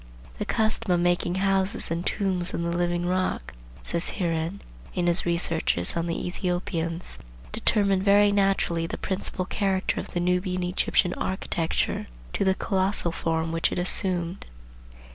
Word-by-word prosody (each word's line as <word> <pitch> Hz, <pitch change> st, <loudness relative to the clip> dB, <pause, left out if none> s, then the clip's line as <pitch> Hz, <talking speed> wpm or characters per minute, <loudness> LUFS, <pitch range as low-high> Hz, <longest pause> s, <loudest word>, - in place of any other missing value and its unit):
"The -, -, -1 dB
custom 220 Hz, -2 st, +1 dB
of 175 Hz, -, +4 dB
making 175 Hz, 0 st, +1 dB
houses 195 Hz, -2 st, +1 dB
and 170 Hz, +1 st, -1 dB
tombs 185 Hz, -3 st, -1 dB
in 170 Hz, -, -1 dB
the 170 Hz, 0 st, -1 dB
living 175 Hz, 0 st, 0 dB
rock," 185 Hz, -, -1 dB, 0.3 s
says 170 Hz, 0 st, -2 dB
Heeren 170 Hz, 0 st, -1 dB, 0.4 s
in 175 Hz, -, +1 dB
his 175 Hz, +1 st, +3 dB
Researches 165 Hz, -, +1 dB
on 170 Hz, 0 st, -1 dB
the 170 Hz, -, -2 dB
Ethiopians, 175 Hz, -2 st, -2 dB, 0.3 s
"determined 195 Hz, -, +2 dB
very 205 Hz, +1 st, +5 dB
naturally 195 Hz, -4 st, +2 dB
the -, -, -4 dB
principal 185 Hz, -1 st, -2 dB
character 195 Hz, -1 st, 0 dB
of -, -, -5 dB
the -, -, +2 dB
Nubian 180 Hz, +1 st, 0 dB
Egyptian 180 Hz, 0 st, +2 dB
architecture 175 Hz, -3 st, -1 dB, 0.3 s
to -, -, +1 dB
the 190 Hz, -1 st, +3 dB
colossal 190 Hz, -4 st, 0 dB
form 165 Hz, -1 st, -1 dB
which 165 Hz, 0 st, +1 dB
it -, -, -3 dB
assumed. 180 Hz, 0 st, -1 dB
180 Hz, 145 wpm, -26 LUFS, 170-190 Hz, 0.4 s, very